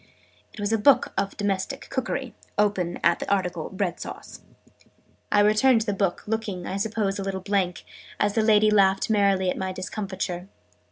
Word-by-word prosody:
It - - -13
was 205 +2 -1
a 225 - +2
book 280 +6 +4
of 195 0 -2
Domestic 205 +6 -2
Cookery, 260 -1 -3 0.2
open 200 -4 0
at 170 0 +3
the - - -4
article 180 -5 -1
Bread 190 -2 -2
Sauce.' - - -9 0.9
I 205 - +5
returned 220 +4 +4
the 210 -2 -1
book, 195 -2 -1
looking, 210 -5 -3
I 190 - -3
suppose, 205 -1 -1
a - - -2
little 195 -1 -3
blank, 190 -2 -1 0.3
as 205 0 +2
the 225 - +2
lady 215 -1 +4
laughed 195 0 +3
merrily 195 -3 +3
at - - -5
my 190 0 -2
discomfiture. 185 -1 -4
200 Hz, 170 wpm, -25 LUFS, 190-215 Hz, 0.9 s, I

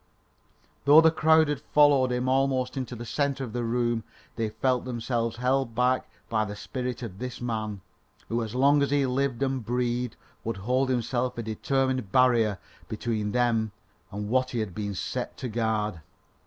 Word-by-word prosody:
Though 145 +2 +9
the 160 0 +5
crowd 160 0 +4
had 145 -2 -2
followed 145 -4 +4
him 125 +1 -1
almost 130 -1 +1
into 130 -2 -4
the 120 +1 -7
centre 140 +2 -1
of 115 -4 -6
the 120 - -2
room, 120 -1 0 0.3
they 115 -2 -1
felt 125 +3 0
themselves 115 -2 -2
held 125 -1 0
back 125 +2 +1 0.2
by 110 -2 +1
the 105 -1 -5
spirit 125 +3 -4
of 100 -5 -7
this 125 0 -5
man, 110 -4 -3 0.5
who 115 +1 -1
as 110 +1 -6
long 140 +3 +4
as 140 - +2
he 140 -1 +2
lived 130 0 0
and 135 -2 -1
breathed 120 0 -1 0.3
would 115 -1 -3
hold 125 +7 0
himself 125 0 -1
a 115 - -3
determined 130 0 -1
barrier 120 -5 +4 0.3
between 110 -1 -2
them 115 -3 +1 0.4
and 105 +1 -4
what 130 +3 +1
he 120 - -3
had 105 -5 -3
been 100 -1 -4
set - - -4
to 130 - -4
guard. 110 -5 -1
125 Hz, 175 wpm, -27 LUFS, 110-130 Hz, 0.5 s, Though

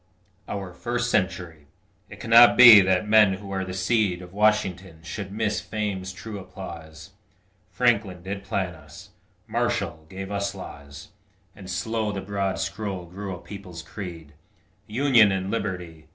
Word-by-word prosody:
OUR 95 -3 -5
FIRST 120 +4 -2
CENTURY 90 -6 -2 0.4
It 105 - -12
cannot 115 +1 +7
be 120 -5 +11
that 95 +2 +1
men 105 -2 +5
who 100 +1 -8
are 95 -1 -2
the 95 0 -6
seed 95 -2 0
Of 90 +1 -13
Washington 95 -5 0
should 95 +3 -6
miss 105 -3 -1
fame's 100 -3 -4
true 100 +2 -8
applause; 85 -3 -10 0.6
Franklin 100 -3 0
did 100 +1 -5
plan 95 -3 -2
us; 75 -2 -14 0.3
Marshall 80 0 -2
gave 95 +1 -7
us 100 0 -2
laws; 70 +2 -10 0.5
And 95 -2 -11
slow 105 +4 -2
the 100 - -4
broad 95 -1 -2
scroll 100 -4 -4
grew 95 +2 -7
a - - -11
people's 90 -3 -10
creed 85 -4 -9 0.5
Union 115 -2 +4
and 95 0 -2
Liberty! 90 -8 -5
95 Hz, 145 wpm, -25 LUFS, 90-105 Hz, 0.6 s, be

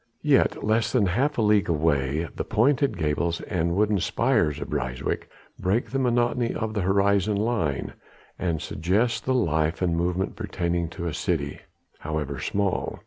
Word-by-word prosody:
Yet - - +3
less 110 +1 +1
than 120 -6 +3
half 135 +11 0
a 115 - +2
league 105 -3 +3
away 75 -1 +1
the - - -2
pointed 135 +4 +2
gables 80 +2 0
and 85 -1 -1
wooden 105 0 +2
spires 105 - +1
of 70 - -6
Ryswyk 65 -3 -2 0.3
break 100 +6 0
the 135 - 0
monotony 120 -1 +1
of 110 -1 -3
the 105 - -1
horizon 100 +2 +2
line 100 - -1 0.5
and 85 -4 -1
suggest 100 +10 0
the 130 - +1
life 80 -7 +1
and 90 -3 +1
movement 90 +2 -1
pertaining 85 -1 -2
to 85 +1 -6
a 85 - -2
city, 75 -3 -2 0.4
however 75 -3 -3
small. 100 +3 -1
90 Hz, 155 wpm, -25 LUFS, 80-110 Hz, 0.5 s, Yet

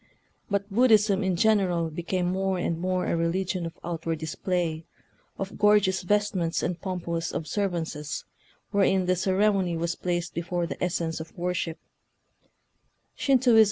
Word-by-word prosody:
But 200 0 0
Buddhism 215 -3 +4
in 190 -1 +1
general 180 -5 +2
became 175 +3 -2
more 190 0 0
and 170 -2 -1
more 185 +1 0
a - - 0
religion 170 +1 -1
of 165 - -10
out 165 -1 -5
ward 165 -1 0
display, 160 +1 -2 0.5
of 195 0 -5
gorgeous 210 -2 +4
vestments 190 -3 0
and 175 -1 -2
pompous 170 -3 -3
observances, 165 -4 -3 0.5
wherein 195 -2 +3
the 185 0 +2
cere 190 +3 +3
mony 180 -4 0
was 170 +1 -1
placed 175 -1 -2
before 175 +1 -2
the 170 - -5
essence 165 -2 -1
of 160 0 -9
worship. 175 -1 -2
180 Hz, 135 wpm, -27 LUFS, 170-195 Hz, 0.5 s, Buddhism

